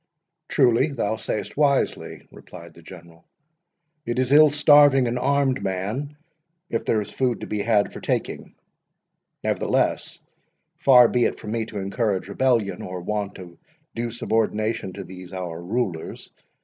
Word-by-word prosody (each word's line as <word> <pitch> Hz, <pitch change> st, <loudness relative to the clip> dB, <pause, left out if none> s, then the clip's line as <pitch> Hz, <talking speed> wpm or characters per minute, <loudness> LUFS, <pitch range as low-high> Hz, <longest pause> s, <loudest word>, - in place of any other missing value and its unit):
"Truly, 120 Hz, +3 st, +3 dB
thou 110 Hz, -7 st, -2 dB
say'st 110 Hz, -1 st, -4 dB
wisely," 140 Hz, -2 st, 0 dB
replied 85 Hz, -1 st, -13 dB
the 85 Hz, -, -16 dB
General; 85 Hz, -1 st, -14 dB, 0.8 s
"it 120 Hz, -2 st, -3 dB
is 130 Hz, 0 st, 0 dB
ill 150 Hz, +1 st, +7 dB
starving 145 Hz, -3 st, +5 dB
an 120 Hz, +1 st, -2 dB
armed 135 Hz, 0 st, +1 dB
man, 105 Hz, +11 st, -4 dB, 0.5 s
if 115 Hz, -, -2 dB
there 110 Hz, -, +1 dB
is 105 Hz, 0 st, -8 dB
food 125 Hz, 0 st, -1 dB
to -, -, -5 dB
be 105 Hz, -, -3 dB
had 105 Hz, -1 st, +1 dB
for -, -, -9 dB
taking—nevertheless, -, -, -4 dB, 0.6 s
far 125 Hz, -3 st, +7 dB
be 120 Hz, +1 st, +1 dB
it -, -, -2 dB
from 105 Hz, -, -7 dB
me 115 Hz, -1 st, -1 dB
to 110 Hz, -, -8 dB
encourage 100 Hz, 0 st, -2 dB
rebellion, 115 Hz, -3 st, 0 dB
or 90 Hz, -1 st, -6 dB
want 105 Hz, +2 st, -3 dB
of 90 Hz, -2 st, -11 dB, 0.4 s
due 120 Hz, +1 st, -3 dB
subordination 110 Hz, -2 st, -1 dB
to 100 Hz, -, -7 dB
these 90 Hz, 0 st, -11 dB
our 85 Hz, -3 st, -5 dB
rulers. 95 Hz, -4 st, -4 dB
110 Hz, 145 wpm, -23 LUFS, 95-130 Hz, 0.8 s, ill